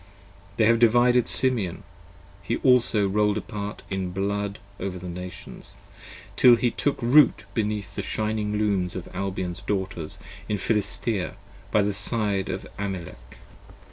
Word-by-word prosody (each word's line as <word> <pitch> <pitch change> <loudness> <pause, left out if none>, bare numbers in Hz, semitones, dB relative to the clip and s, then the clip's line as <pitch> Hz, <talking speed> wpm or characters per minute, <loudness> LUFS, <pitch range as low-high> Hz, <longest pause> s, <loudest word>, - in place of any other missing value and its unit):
They 110 - +4
have 115 +1 +4
divided 120 +1 +4
Simeon: 110 -9 +2 0.6
he 110 +4 -2
also 115 -5 +3
roll'd 105 +1 +1
apart 105 -1 -6
in 95 -1 -2
blood 100 +2 -2 0.2
45 95 - -3
Over 90 -1 -5
the 90 0 -8
Nations, 90 +1 -9 0.6
till 125 -2 +7
he 120 0 0
took 145 - -1
Root 135 +4 +5
beneath 105 -2 -2
the - - -3
shining 105 -1 -1
Looms 100 -4 0
Of 95 - -6
Albion's 95 -2 -3
Daughters 95 -5 -3 0.3
in 105 - 0
Philistea 105 -1 0 0.3
by 105 - +3
the 100 0 0
side 105 -2 +1
of - - -4
Amalek. 85 -12 -6
105 Hz, 140 wpm, -25 LUFS, 95-110 Hz, 0.6 s, till